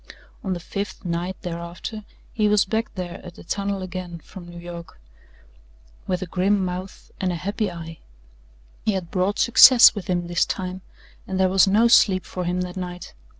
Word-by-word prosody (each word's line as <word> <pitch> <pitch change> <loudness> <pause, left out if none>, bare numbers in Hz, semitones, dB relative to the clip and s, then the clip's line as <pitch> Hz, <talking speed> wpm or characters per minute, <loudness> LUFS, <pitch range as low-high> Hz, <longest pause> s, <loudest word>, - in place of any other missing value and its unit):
On 190 - -1
the 175 - -4
fifth 200 +3 -6
night, 175 +2 -3
thereafter 175 +5 -6 0.3
he 215 -2 +2
was 210 -1 +4
back 220 +3 -2
there 180 -2 -6
at 180 -2 -10
the - - -12
tunnel 200 +1 -2
again 180 -2 -6
from 175 +2 -12
New 175 0 -11
York 170 - -9 1.1
with 180 0 -1
a - - -4
grim 190 +2 +1
mouth 180 +1 -7
and 185 -1 0
a - - -2
happy 200 +4 -2
eye. 165 -2 -9 0.8
He 215 - +1
had 180 -3 -4
brought 190 +2 0
success 240 +1 +8
with 205 -4 -7
him 175 -1 -1
this 175 0 +1
time 185 0 -4 0.5
and 190 0 -3
there 190 -1 +4
was 190 +1 +4
no 215 +4 +4
sleep 190 -5 +4
for 180 -1 -5
him 180 +1 -1
that 180 -1 -5
night. 180 -1 -6
185 Hz, 185 wpm, -23 LUFS, 175-200 Hz, 1.1 s, success